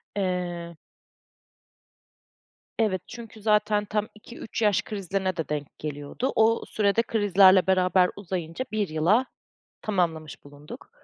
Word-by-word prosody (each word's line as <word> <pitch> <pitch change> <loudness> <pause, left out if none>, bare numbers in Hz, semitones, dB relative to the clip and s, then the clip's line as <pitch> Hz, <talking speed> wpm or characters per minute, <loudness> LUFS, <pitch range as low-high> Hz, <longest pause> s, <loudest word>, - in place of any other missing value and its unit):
Eee 175 -3 -3 2.0
Evet, 200 -5 +1
çünkü 225 -2 -10
zaten 210 0 +2
tam 210 +1 -2
2-3 225 +1 -8
yaş 210 -3 +3
krizlerine 190 -2 -3
de 165 - -3
denk 150 -2 -5
geliyordu. 150 - -4
O 225 +1 +3
süre 200 -2 0
de 230 - +4
krizlerle 195 -4 +4
beraber 185 -1 +3
uzayınca 180 +2 -5
1 215 -2 0
yıla 170 +11 +2 0.6
tamamlamış 165 -7 -2
bulunduk. 145 +1 -12
190 Hz, 115 wpm, -26 LUFS, 170-215 Hz, 2.0 s, de